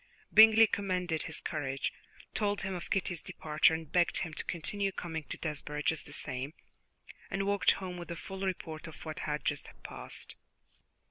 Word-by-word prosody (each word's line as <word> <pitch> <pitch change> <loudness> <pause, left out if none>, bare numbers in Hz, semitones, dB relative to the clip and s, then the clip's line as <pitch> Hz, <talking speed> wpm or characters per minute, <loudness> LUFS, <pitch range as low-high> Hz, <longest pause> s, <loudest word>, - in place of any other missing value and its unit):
Bingley 220 +1 +10
commended 180 -6 0
his 160 - -4
courage, 135 -1 -2 0.4
told 205 -2 +1
him 190 0 -2
of 175 -2 -5
Kitty's 175 -4 0
departure, 155 +1 +3
and 160 -1 -7
begged 175 -1 +3
him 165 -4 -2
to - - -2
continue 195 +4 -1
coming 160 -4 -4
to - - -5
Desborough 150 -2 -3
just 160 +1 0
the - - -10
same; 140 0 -4 0.7
and 195 0 -1
walked 200 0 +4
home 185 -2 -5
with 175 -1 -7
a 170 - -3
full 190 +2 -7
report 165 -4 -3
of 160 0 -10
what 155 -1 -5
had 150 0 -2
just 145 -1 -1
passed. - - -8
170 Hz, 175 wpm, -32 LUFS, 155-190 Hz, 0.7 s, Bingley